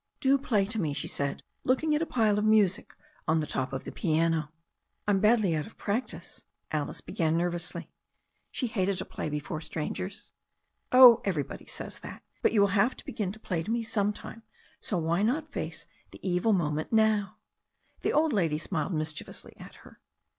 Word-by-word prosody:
"Do 275 -1 +4
play 210 -7 +1
to 220 +1 -2
me," 150 -4 -1
she - - -3
said, 140 -1 -2 0.2
looking 300 +5 +2
at 300 - +2
a 330 - -1
pile 215 -4 +2
of - - -1
music 215 -4 +3 0.3
on 160 +1 +3
the 155 - -1
top 130 -3 -2
of 135 - -4
the - - -7
piano. 160 -2 +1 0.6
"I'm 200 -2 +3
badly 210 -5 +4
out 150 - -2
of 225 - -16
practice," 205 -5 -4 0.3
Alice 150 -2 -2
began 160 -1 0
nervously. 175 0 -2 0.6
She 255 - -3
hated 200 -5 0
to 190 - -2
play - - -5
before 150 +1 -4
strangers. 185 +6 -5 0.6
"Ob 250 -2 +9
everybody 165 -8 -3
says - - -7
that. - - -10 0.2
But - - +3
you 215 - +4
will 200 - +6
have 205 +6 +2
to - - -12
begin 200 -4 -3
to 220 - -5
play 180 -6 -2
to 220 +8 -1
«e 235 - -1
some 210 -3 0
time, 225 +2 -10 0.4
so 200 - -2
why 170 +2 +1
not 285 +9 0
face 165 - -5 0.2
the - - -13
evil 180 +5 +2
moment 155 -5 0
now?" 220 -2 +2 0.6
The - - 0
old 310 -1 +3
lady 165 -7 +1
smiled 160 +2 -2
mischievously 155 0 -5
at - - -12
her. - - -16
195 Hz, 185 wpm, -29 LUFS, 160-220 Hz, 0.6 s, Ob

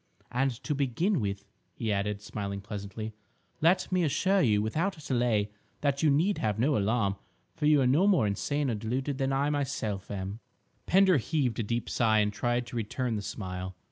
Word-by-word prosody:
"And, 135 +3 +2
to 140 - -1
begin 145 - +1
with," 100 -2 -3 0.3
he 110 - -2
added, 100 +1 -2
smiling 100 -2 -4
pleasantly, 105 +1 -6 0.5
"let 170 +5 +3
me 185 -1 +2
assure 190 +6 +2
you 105 -5 +3
without 160 - -1
delay 120 -7 0 0.3
that 140 -1 +1
you 155 - +4
need 165 +8 +2
have 105 -2 0
no 135 +6 +2
alarm, 100 -2 +1 0.4
for 150 -2 0
you 150 -2 +5
are - - +3
no 150 +10 +4
more 185 - +4
insane 135 +7 0
or - - 0
deluded 130 +6 -2
than 135 0 +1
I 140 +2 +1
myself 110 -9 -2
am—" 100 +1 -4 0.5
Pender 190 -2 +5
heaved 130 -3 0
a - - +2
deep 115 +2 -2
sigh 110 -2 +2
and 105 -1 +2
tried 120 +3 0
to 120 - -9
return 115 +2 -2
the 105 - -2
smile. 95 -2 -5
120 Hz, 185 wpm, -29 LUFS, 105-145 Hz, 0.5 s, you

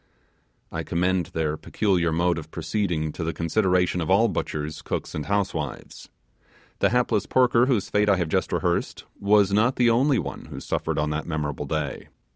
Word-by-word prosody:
I - - -3
commend 90 0 0
their 80 -1 -2
peculiar 90 -4 0
mode 85 +1 +1
of 80 0 -10
proceeding 85 -6 -2
to 85 - -5
the 80 0 -2
consideration 90 0 +1
of 80 - -3
all 110 +5 +4
butchers, 75 -5 -3
cooks, - - -4
and 75 - -4
housewives. 100 -1 -3 0.7
The - - +3
hapless 120 -3 +1
porker 125 -1 +4
whose 115 -8 0
fate 105 0 +2
I 100 - +5
have 85 -2 -1
just - - 0
rehearsed, - - -1 0.2
was 100 -1 +3
not 115 +5 +3
the 120 -1 +4
only 130 +3 +3
one 70 -9 -5
who - - -8
suffered - - -2
in 75 0 0
that 75 +1 -3
memorable 75 -4 -3
day. 75 -3 -3
90 Hz, 175 wpm, -25 LUFS, 80-105 Hz, 0.7 s, I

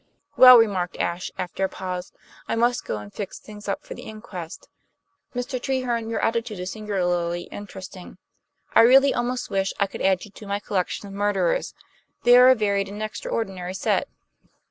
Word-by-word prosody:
"Well," 255 -1 +10
remarked 195 -6 +1
Ashe, 170 +1 -2
after 185 +1 -3
a 190 - +1
pause, 185 -1 -5 0.4
"I - - -1
must 240 +1 +1
go - - -3
and 105 -1 -10
fix 200 - -6
things 210 -1 -12
up 200 - -2
for - - -8
the - - -10
inquest. 205 -6 -9 0.7
Mr. 245 +1 -3
Treherne, 245 -4 -1
your 230 - -2
attitude 225 -2 -1
is 180 +1 -4
singularly 175 -5 -1
interesting; 190 -3 -9 0.6
I - - +7
really 270 +4 +6
almost 245 -1 -2
wish 195 0 0
I 200 - +4
could 195 - -8
add 190 0 +2
you 210 - -15
to 205 0 -12
my 200 0 -1
collection 200 0 -2
of 195 - -10
murderers. 200 -3 0 0.5
They 245 0 +7
are 250 +1 +8
a 260 - +7
varied 200 -3 0
and 205 +2 -6
extraordinary 195 -3 -4
set." - - 0
205 Hz, 175 wpm, -24 LUFS, 185-230 Hz, 0.7 s, Well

